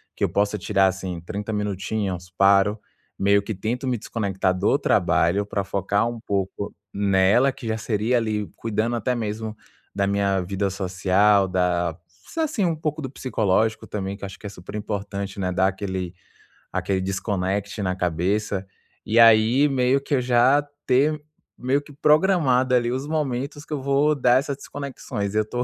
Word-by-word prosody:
que - - -4
eu - - +3
possa 100 +1 0
tirar, 95 0 +2
assim, 95 -2 -3
30 100 +5 -5
minutinhos". 100 -3 -3
Paro, 100 +2 +4 0.4
meio 100 +1 +3
que 110 +2 -4
tento 115 +7 -3
me 125 -2 0
desconectar 95 -4 -1
do - - +2
trabalho 100 +5 +2
pra 100 -1 -2
focar 100 +3 0
um 120 -1 -5
pouco 100 0 -3 0.2
nela, 100 +6 +3
que 130 -2 -9
já 110 0 -1
seria, 110 +2 0
ali, 105 -5 -1
cuidando 115 +1 -1
até 125 +2 0
mesmo 110 -1 -4 0.4
da 100 -1 +1
minha 100 -1 +1
vida 95 +2 -2
social, 95 +1 +2
da 90 -2 0 0.3
sa 325 - -2
assim, 290 -9 -1
um 170 -2 +1
pouco 155 -1 -3
do 130 - -4
psicológico 110 -4 0
também, 100 -1 -4
que 100 - -15
eu - - -2
acho 95 - -11
que - - -14
é - - -5
super 95 +1 -10
importante, 100 -1 -4
né, 90 -1 -1
dar 95 +1 +2
aquele 95 -2 -3 0.6
aquele 95 -1 -1
desconect 100 +1 -2
na 95 -1 -1
cabeça. 95 +3 -1 0.4
E 110 - 0
aí, 115 +5 +6
meio 130 +1 +2
que 140 +1 -1
eu 125 - +1
já 125 +4 +4 0.2
ter 145 +4 +2 0.4
meio 135 +3 0
que 145 0 -15
programado, 150 -5 +3
ali, 120 -1 +2
os 130 +3 -3
momentos 145 -2 -2
que - - -20
eu 140 - -2
vou 140 +3 +2
dar 125 -2 +4
essas 140 0 -4
desconexões. 125 -9 -5
eu 110 -1 +2
tô 125 0 -1
105 Hz, 175 wpm, -23 LUFS, 95-125 Hz, 0.6 s, aí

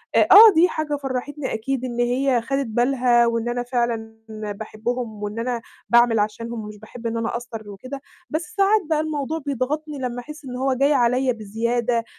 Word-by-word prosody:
آآ، - - +5
آه 430 -1 +10
دي 345 +3 +5
حاجة 305 -1 -2
فرّحتني 270 +2 -3
أكيد 255 +3 -2
إن 240 -1 -5
هي 250 +1 +2
خَدِت 275 +3 -2
بالها 240 +1 +3
وإن 230 0 -1
أنا 245 0 -2
فعلًا 235 -3 -2
باحبهم 215 +1 -5
وإن 210 +2 -4
أنا 240 0 -2 0.3
باعمل 235 -2 +5
عشانهم 230 +3 -2
ومش 210 0 -9
باحب 230 +2 -8
إن 230 0 -2
أنا 230 0 -1
أقصّر 230 -3 -6
وكده، 255 +8 -8 0.3
بس 310 +2 -2
ساعات 400 +2 +4
بقى 310 -2 +2
الموضوع 310 0 -2
بيضغطني 290 +3 -2
لمّا 245 -1 -3
أحس 300 +3 -11
إن 250 -1 -6
هو 265 +1 +1
جاي 275 +3 +3
عليَّ 250 0 +2
بزيادة، 230 +2 -1
245 Hz, 175 wpm, -22 LUFS, 230-275 Hz, 0.3 s, آه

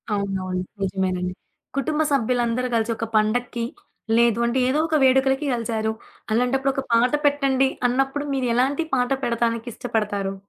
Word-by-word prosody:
అవునవును. 190 -2 -2 0.2
నిజమేనండి. 185 -1 -1 0.4
కుటుంబ 310 +2 0
సభ్యులందరూ 245 -1 +1
కలిసి 225 0 +1
ఒక 225 - -2
పండక్కి, 230 +2 +1 0.5
లేదు 235 -1 +3
అంటే 245 +2 +1
ఏదో 285 +4 +1
ఒక 315 - +2
వేడుకలకి 265 +2 +3
కలిసారు. 220 -2 -1 0.4
అలాంటప్పుడు 260 +4 +2
ఒక 270 - -2
పాట 240 +2 +4
పెట్టండి 275 -2 +3 0.2
అన్నప్పుడు 270 +3 0
మీరేలాంటి 260 +4 +1
పాట 250 +1 0
పెడతానికిష్టపడతారు? 225 -4 -2
240 Hz, 120 wpm, -23 LUFS, 220-265 Hz, 0.5 s, పాట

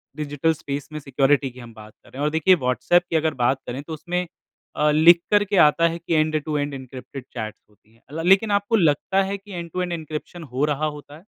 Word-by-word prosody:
Digital 150 +1 0
space 145 -2 -6
में 155 - -4
security 135 0 +1
की, 125 - -14
हम 120 -2 -11
बात 110 -1 -13
कर - - -19
रहे - - -13
हैं, - - -1
और - - +2
देखिए, 160 +4 +4
व्हाट्सएप 155 +5 +2
की - - -2
अगर 160 0 +1
बात 130 +2 +2
करें 125 +3 -4
तो 160 - -7
उसमें, 180 +3 -3 0.5
अ, 150 - +2
लिख 170 +3 +6
कर 205 0 +5
के 200 - +2
आता 165 +3 +3
है 165 0 -3
कि 170 0 -3
एंड-टू-एंड 155 -2 0
एनक्रिप्टेड 130 0 -9
चैट 110 -3 -5
होती 105 +1 -29
है। 150 +7 -8
लेकिन 195 +4 +4
आपको 205 +3 +1
लगता 190 +1 +2
है 195 +1 -3
कि 200 +1 -16
एंड-टू-एंड 175 +1 -4
एनक्रिप्शन 160 +1 -6
हो 135 +3 +1
रहा 150 +2 -1
होता 150 -1 -7
है? 165 - -18
155 Hz, 220 wpm, -23 LUFS, 140-170 Hz, 0.5 s, लिख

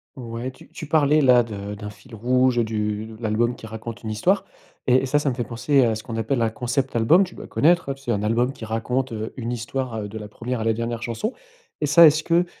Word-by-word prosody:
Ouais, 120 0 -5
tu 130 - -15
tu 155 - -8
parlais 150 0 +4
là, 125 -3 +6
de 105 -2 -6
d'un 105 0 -7
fil 110 +4 -14
rouge 125 +2 +2
du 110 0 -3
l'album 120 +2 0
qui 110 - -10
raconte 110 +1 -7
une 110 - -5
histoire 180 - +1 0.4
et 125 - +5
et - - 0
ça, 145 +3 +2
ça 145 - 0
me 125 - -2
fait 120 - -2
penser, 130 +4 +2
à 115 -2 +2
ce 110 - -6
qu'on 115 -1 -7
appelle 115 +3 0
un 115 - +2
concept 125 +3 -2
album. 135 +12 +5
Tu 185 - -8
dois - - -9
connaître, 170 -1 +2
heu, - - 0
t 135 - -17
c'est 125 -3 -2
un 105 -2 0
album 120 +4 +1
qui 115 -5 -9
raconte, 125 +3 -1
heu, 110 0 -5
une 120 -1 -3
histoire, 120 +1 -3
heu, 105 - -5
de 110 +2 -8
la 105 -1 -7
première 120 +3 -4
à - - -1
la 115 0 +2
dernière 115 +1 -3
chanson. 125 - -3 0.5
Et - - +2
ça, 160 +3 +8
est-ce 155 +1 +3
que 170 +2 +3
120 Hz, 255 wpm, -23 LUFS, 110-135 Hz, 0.5 s, ça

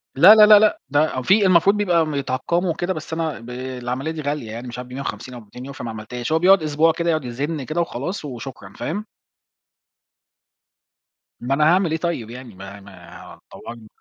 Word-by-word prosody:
لا، 185 +10 +8
لا، 215 -1 +8
لا، 210 -1 +8
لأ 215 0 +2
ده 145 -2 +1
في 195 - +3
المفروض 185 +3 +4
بيبقى 175 -6 +1
يتعقموا 155 +7 -1
وكده 175 +3 -2
بس 155 -1 -8
أنا 160 -4 -3
ب 115 - -12
العملية 125 +3 -5
دي 160 -1 -6
غالية 145 -6 -4
يعني 120 +3 -7
مش 120 - -8
عارف 125 0 -8
ب150 125 -2 -6
أو 120 - -8
ب200€ 125 +6 -11
فما 120 -3 -7
عملتهاش. 120 +5 -6
هو 160 - +3
بيقعد 185 -1 +5
أسبوع 155 +2 +2
كده 170 +1 -2
يقعد 155 -5 0
يزّن 140 +5 -4
كده 155 +5 -2
وخلاص 160 +3 -4
وشكرًا 120 -6 -9
فاهم. 205 +7 -4 2.3
ما 125 +3 -2
أنا 150 +2 +2
هاعمل 180 -4 +1
إيه 160 - 0
طيب 165 -10 -3
يعني، 125 -3 -10
ما 100 +1 -10
ما 95 -3 -14
دوّرنا. 115 -2 -10
140 Hz, 185 wpm, -21 LUFS, 125-170 Hz, 2.3 s, لا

